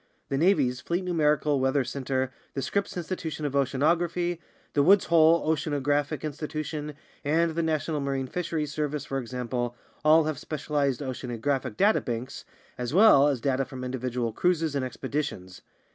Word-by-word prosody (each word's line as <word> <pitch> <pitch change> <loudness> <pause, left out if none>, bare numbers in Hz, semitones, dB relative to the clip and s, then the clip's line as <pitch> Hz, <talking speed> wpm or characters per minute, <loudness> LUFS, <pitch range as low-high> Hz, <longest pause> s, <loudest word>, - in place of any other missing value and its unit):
The 135 - 0
Navy's 130 -8 +2
Fleet 175 +6 -2
Numerical 150 -4 +2
Weather 130 +1 +2
Central, 130 +1 -2 0.3
the 135 - -2
Scripps 200 +7 -2
Institution 165 -3 -4
of 140 - -2
Oceanography, 170 +6 +1 0.3
the 145 - +3
Woods 190 +6 +5
Hole 165 0 +4
Oceanographic 145 -2 0
Institution, 150 0 -4 0.3
and 160 +3 +2
the 170 - 0
National 155 -1 -1
Marine 135 -1 -1
Fisheries 155 0 -3
Service, 150 -2 -2
for 135 0 -2
example, 120 0 -3 0.3
all 155 +1 +6
have 155 -2 -2
specialized 145 -3 -1
oceanographic 130 -1 -3
data 210 +2 +4
banks, 120 +2 -5 0.3
as 125 +4 -3
well 185 -9 +7
as 135 -5 0
data 135 +1 +1
from 130 -1 -8
individual 125 -2 -2
cruises 165 0 +1
and 140 -2 -1
expeditions. 125 -7 -4
145 Hz, 145 wpm, -27 LUFS, 130-160 Hz, 0.3 s, well